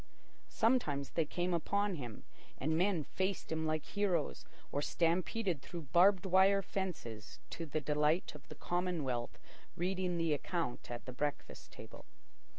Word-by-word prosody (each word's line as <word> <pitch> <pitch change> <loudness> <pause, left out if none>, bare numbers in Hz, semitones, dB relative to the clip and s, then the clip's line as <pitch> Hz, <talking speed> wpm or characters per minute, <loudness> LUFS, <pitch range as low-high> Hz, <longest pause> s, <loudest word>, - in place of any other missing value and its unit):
Sometimes 215 - +1
they 165 - +1
came 175 +2 -1
upon 200 +4 +1
him, 125 -9 -6 0.3
and 155 +4 0
men 180 -1 +2
faced 190 +4 -2
him 160 0 0
like 155 -1 -1
heroes, 190 -7 0 0.3
or 145 - 0
stampeded 170 +2 +1
through 165 -5 -8
barbed 185 +2 +6
wire 190 +1 +5
fences 140 - -5
to 165 - -5
the 155 +1 -1
delight 150 +4 +1
of 150 -1 -13
the - - -8
commonwealth 160 -9 -1 0.4
reading 180 0 0
the 165 -2 +2
account 150 -3 -2
at 120 -1 -6
the 130 - -6
breakfast 145 +3 -4
table. - - -11
170 Hz, 145 wpm, -35 LUFS, 150-185 Hz, 0.4 s, barbed